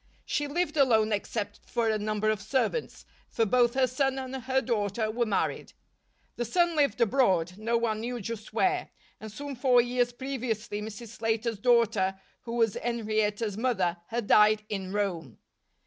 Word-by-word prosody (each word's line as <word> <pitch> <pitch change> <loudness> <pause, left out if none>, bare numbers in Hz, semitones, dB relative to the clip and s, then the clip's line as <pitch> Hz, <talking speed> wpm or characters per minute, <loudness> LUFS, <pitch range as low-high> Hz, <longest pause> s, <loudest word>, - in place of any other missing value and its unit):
She 290 - -1
lived 310 +1 -1
alone 220 -6 +4
except 205 0 -3
for 235 -1 0
a 215 -1 +1
number 215 0 0
of 215 -2 -3
servants; 265 - -2 0.2
for 225 - +1
both 240 +2 +3
her 265 -1 +4
son 265 +2 0
and 260 0 -5
her 265 +1 0
daughter 215 -3 -1
were 235 +1 0
married. 205 - -1 0.6
The 240 - 0
son 345 +7 +2
lived 285 -4 +2
abroad, 195 -8 +2
no 230 +2 +1
one 225 -2 -1
knew 240 +2 -4
just 220 0 -6
where; 365 +11 +1 0.3
and 220 0 -8
some 280 +5 -6
four 250 -1 +4
years 245 0 +1
previously 240 -5 -4
Mrs. 220 +2 -7
Slater's 225 -1 -2
daughter, 220 -5 +2 0.3
who 230 - -5
was 225 -3 +2
Henrietta's 215 -2 -1
mother, 190 -8 0
had 235 -1 -3
died 215 +1 +5
in 190 -3 -4
Rome. 180 - -2
230 Hz, 165 wpm, -28 LUFS, 210-250 Hz, 0.6 s, died